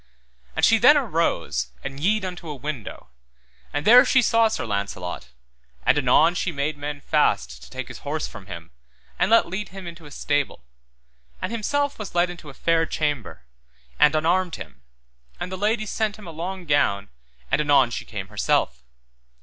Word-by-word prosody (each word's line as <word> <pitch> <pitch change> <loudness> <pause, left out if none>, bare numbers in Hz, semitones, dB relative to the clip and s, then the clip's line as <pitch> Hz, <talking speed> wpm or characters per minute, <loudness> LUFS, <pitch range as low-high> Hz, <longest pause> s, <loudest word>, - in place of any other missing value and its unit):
And - - +4
she - - +5
then - - +7
arose 65 0 0 0.2
and 135 - -6
yede 200 +5 +1
unto 180 -3 -6
a 150 - -4
window, 135 - -6 0.6
and 145 +1 -3
there 245 +3 +9
she 265 -2 +3
saw 230 +1 +4
Sir 220 - -3
Launcelot, 100 - -4 0.6
and - - +5
anon 145 +4 +4
she 180 0 -1
made 145 0 -2
men 145 0 -6
fast 65 - +1
to - - -13
take 130 0 -6
his - - -9
horse 150 +2 -3
from 95 - -12
him 85 -3 -9 0.5
and - - +2
let 230 +1 +5
lead 190 +4 -4
him 190 0 -9
into 170 -2 -9
a - - -11
stable, 145 - -2 0.7
and - - -4
himself 285 +5 -1
was 210 - -7
led 175 +1 +2
into 170 -4 -11
a 135 - -12
fair 165 -1 +1
chamber, 145 - -3 0.6
and 150 - +5
unarmed 170 +3 +1
him, 70 -3 -10 0.6
and 180 - -4
the - - -3
lady 215 +3 0
sent 215 0 -1
him 210 - -12
a 170 - -7
long 180 +3 -5
gown, 100 - +1 0.4
and 135 +3 +3
anon 140 -4 +4
she - - -4
came 100 -4 -7
herself. 65 -11 0
150 Hz, 180 wpm, -24 LUFS, 125-185 Hz, 0.7 s, there